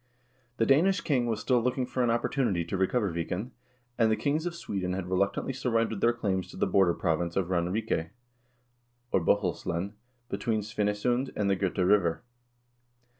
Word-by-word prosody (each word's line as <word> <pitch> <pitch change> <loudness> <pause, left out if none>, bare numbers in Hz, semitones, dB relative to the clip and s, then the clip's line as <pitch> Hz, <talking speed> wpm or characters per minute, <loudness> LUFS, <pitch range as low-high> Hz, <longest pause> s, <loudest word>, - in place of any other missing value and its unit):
The 115 - +2
Danish 170 - +4
king 130 -7 +1
was 110 -2 -1
still 125 0 +2
looking 125 +2 0
for 125 0 -1
an 120 - +2
opportunity 115 - 0
to 85 - -3
recover 95 0 +1
Viken, 90 +8 -3 0.5
and 115 -1 +4
the 110 - +3
kings 150 +7 0
of 170 - -4
Sweden 95 - -3
had 95 -1 -3
reluctantly 100 +7 0
surrendered 115 -5 0
their 120 - +5
claims 100 -6 -2
to - - -11
the - - +2
border 95 -3 +3
province 85 +1 -1
of 95 -2 0
Ranrike, 90 -1 0 1.0
or 95 - +3
Bohuslen, 90 0 0 0.3
between 110 -3 -1
Svinesund 105 +5 0
and 100 -1 +1
the - - +3
Gota 95 -1 0
River. 95 -2 +2
105 Hz, 165 wpm, -29 LUFS, 95-120 Hz, 1.0 s, their